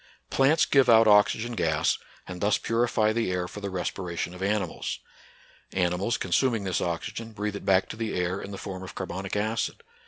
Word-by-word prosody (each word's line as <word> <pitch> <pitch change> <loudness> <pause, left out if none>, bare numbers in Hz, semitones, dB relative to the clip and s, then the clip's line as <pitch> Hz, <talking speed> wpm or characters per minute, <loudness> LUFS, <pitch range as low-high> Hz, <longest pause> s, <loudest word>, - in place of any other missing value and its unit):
Plants 140 +4 +4
give 135 -3 +4
out 115 -1 +7
oxygen 105 +3 +4
gas, 80 -7 +1 0.3
and 90 -1 -7
thus 105 0 +3
purify 115 -2 +1
the 115 -4 0
air 90 -1 -1
for 105 - -9
the 100 - -3
respiration 90 -2 -3
of 90 - -10
animals. 100 -3 -1 0.8
Animals, 95 +5 +1
consuming 115 +4 +1
this 95 -2 -1
oxygen, 110 +6 -4
breathe 105 0 -3
it - - -7
back 95 0 +3
to - - -6
the 110 -1 -3
air 90 +2 -1
in - - -7
the 100 - -6
form 95 -1 -6
of 95 - -9
carbonic 95 +1 -4
acid. 110 +2 -1
100 Hz, 185 wpm, -27 LUFS, 90-110 Hz, 0.8 s, out